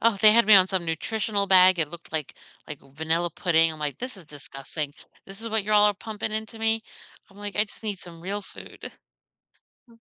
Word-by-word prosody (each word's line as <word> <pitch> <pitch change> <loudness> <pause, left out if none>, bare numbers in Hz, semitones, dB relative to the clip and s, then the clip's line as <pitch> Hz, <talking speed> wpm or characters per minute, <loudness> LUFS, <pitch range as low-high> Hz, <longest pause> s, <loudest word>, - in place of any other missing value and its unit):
Oh, 230 -2 +3
they 215 - +8
had 230 -1 +5
me 215 - +8
on 190 -1 +7
some 185 -3 -1
nutritional 200 +4 -2
bag. 185 -2 +6
It 150 - 0
looked 170 0 -12
like 155 -3 -4 0.3
like 150 -2 -6
vanilla 160 +5 -2
pudding, 165 -2 +2
I'm 155 - -11
like, 145 -1 -3
"This 255 -2 -7
is 180 -5 -15
disgusting. 145 +1 -7 0.3
This 195 +3 -11
is 230 - -4
what 220 -2 -1
you're 215 0 0
all 210 0 +5
pumping 215 +1 -6
into 220 +1 -5
me?" 225 0 +1 0.4
I'm 195 - -21
like, 205 0 -6
"I 210 - +3
just 205 - -17
need 210 -3 -4
some 170 -2 -12
real 200 +4 -4
food." - - -11 1.0
Uh 230 - -19
195 Hz, 215 wpm, -25 LUFS, 165-215 Hz, 1.0 s, they